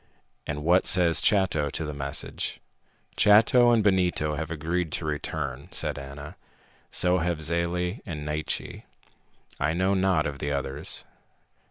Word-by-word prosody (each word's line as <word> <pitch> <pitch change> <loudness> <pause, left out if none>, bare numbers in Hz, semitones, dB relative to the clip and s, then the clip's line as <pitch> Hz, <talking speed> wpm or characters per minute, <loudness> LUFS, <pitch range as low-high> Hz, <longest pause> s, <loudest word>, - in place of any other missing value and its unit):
"And 75 0 -4
what 90 +4 +3
says 85 -3 +5
Chato 90 -8 +2
to 80 - -4
the 75 - -5
message?" 70 0 -2 0.6
"Chato 115 +4 +5
and 115 -2 +3
Benito 90 -6 +1
have 80 +1 -4
agreed 85 +1 -2
to 85 - -3
return," 70 -3 -4
said - - -2
Ana. 70 +2 -9 0.5
"So 90 +1 +1
have 85 -1 -1
Zele 85 - -1
and 75 -3 -6
Naiche. 75 +1 -3 0.8
I 75 +3 +1
know 95 +3 +1
not 95 -5 +2
of 70 -2 -4
the 70 0 -3
others." 70 +1 -3
80 Hz, 140 wpm, -26 LUFS, 75-90 Hz, 0.8 s, says